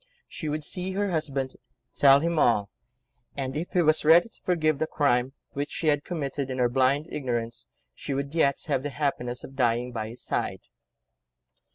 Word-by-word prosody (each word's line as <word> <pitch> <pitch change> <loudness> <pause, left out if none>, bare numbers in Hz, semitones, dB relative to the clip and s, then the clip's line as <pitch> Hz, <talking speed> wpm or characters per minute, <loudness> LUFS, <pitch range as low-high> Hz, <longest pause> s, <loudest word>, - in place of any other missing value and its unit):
She 155 - -5
would 150 +1 -2
see 185 +4 -3
her 200 0 -1
husband, 140 -5 -2 0.4
tell 140 0 +6
him 170 0 0
all, 105 -6 +3 0.7
and, 135 -1 -3
if 165 +4 -4
he 180 - +3
was 155 0 +3
ready 165 +7 +6
to - - -14
forgive 155 -5 +1
the 160 - 0
crime, 130 -4 +1 0.2
which 145 +1 -3
she 160 - -1
had 145 -1 +2
committed 140 -5 -3
in 130 - -3
her 125 -1 +2
blind 135 +4 +2
ignorance, 120 -4 -3 0.3
she 140 - -5
would 140 +1 -3
yet 140 -4 +3
have 130 - 0
the 145 - -3
happiness 130 -4 -2
of 135 - -10
dying 120 -1 +1
by 110 -2 -4
his 120 - -10
side. - - -2
140 Hz, 185 wpm, -27 LUFS, 125-155 Hz, 0.7 s, tell